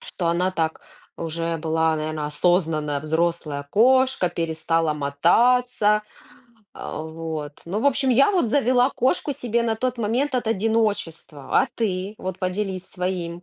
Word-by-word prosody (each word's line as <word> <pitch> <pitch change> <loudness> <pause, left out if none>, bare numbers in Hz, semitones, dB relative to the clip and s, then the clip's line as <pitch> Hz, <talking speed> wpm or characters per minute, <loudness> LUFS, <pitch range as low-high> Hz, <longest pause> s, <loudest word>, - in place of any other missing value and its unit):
что 175 - -5
она 180 +2 +1
так 160 -2 -2 0.4
уже, 165 0 -3
была, 160 0 +1
наверно, 155 -1 -3
осознанная 155 -2 +1
взрослая 155 -2 -1
кошка, 255 -3 +3
перестала 165 -1 0
мотаться. 210 - +2 0.7
А 155 - -6
вот, 160 -2 -6
ну 200 +6 -2
в 280 - +1
общем, 270 -1 +2
я 275 - +5
вот 370 -7 +2
завела 255 +1 +3
кошку 280 +3 0
себе 235 -2 -1
на 225 -1 +1
тот 255 +1 -2
момент 245 +6 0
от 240 - -2
одиночества. 200 -10 -1
А - - -1
ты 200 -2 -2
вот 185 0 -5
поделись 185 0 -3
своим 180 -2 -4
180 Hz, 140 wpm, -23 LUFS, 160-230 Hz, 0.7 s, я